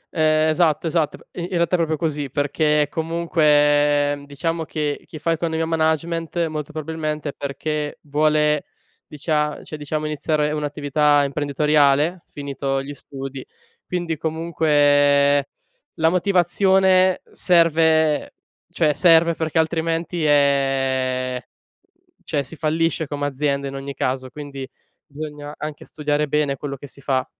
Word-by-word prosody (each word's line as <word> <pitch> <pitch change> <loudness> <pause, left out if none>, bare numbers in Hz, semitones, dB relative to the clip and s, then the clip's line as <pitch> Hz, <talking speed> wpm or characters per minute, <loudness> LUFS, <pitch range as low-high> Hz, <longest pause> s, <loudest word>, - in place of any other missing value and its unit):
Ehm, 155 0 +3
esatto, 155 -1 +2
esatto. 160 -2 0
P - - -22 0.2
in 175 - -3
in - - -8
realtà 170 0 0
è - - +2
proprio 160 -2 0
così 150 -3 -2
perché, 150 +2 +1
comunque, 145 -3 +2
diciamo 165 +3 -2
che 150 -2 -3
chi 155 - -9
fa 165 +2 -1
Economia 165 0 -1
e - - 0
Management, 165 +1 0
molto 155 -1 -5
probabilmente 155 -1 -4
è - - -6
perché, 145 +2 -4
vuole 150 0 +1 0.4
dicia 150 0 -2
cioè - - -8
diciamo, 150 +1 -3
iniziare 150 0 0
un'attività 145 -1 +1
imprenditoriale 145 +3 +2
finito 140 -1 -3
gli 145 +1 -7
studi. 135 -1 -8 0.4
Quindi, 175 -3 -2
comunque, 145 -3 +3 0.5
la 160 0 +3
motivazione 185 +1 +3
serve 160 -3 +3 0.4
cioè, 160 -4 +1
serve 170 0 +5
perché 160 0 -3
altrimenti, 165 +1 -1
ehm, 135 -3 +1 0.9
cioè 145 - -1
si 140 +4 -10
fallisce 160 0 0
come 145 0 -3
azienda 140 0 -1
in 135 - -8
ogni 140 0 -6
caso. 130 0 -2
Quindi, 140 -2 -8 0.4
bisogna 150 0 -8
anche 150 -1 -7
studiare 150 0 -1
bene 145 -1 0
quello 140 0 -5
che 145 - -11
si 140 - -16
fa. 130 -1 0
150 Hz, 130 wpm, -21 LUFS, 145-160 Hz, 0.9 s, serve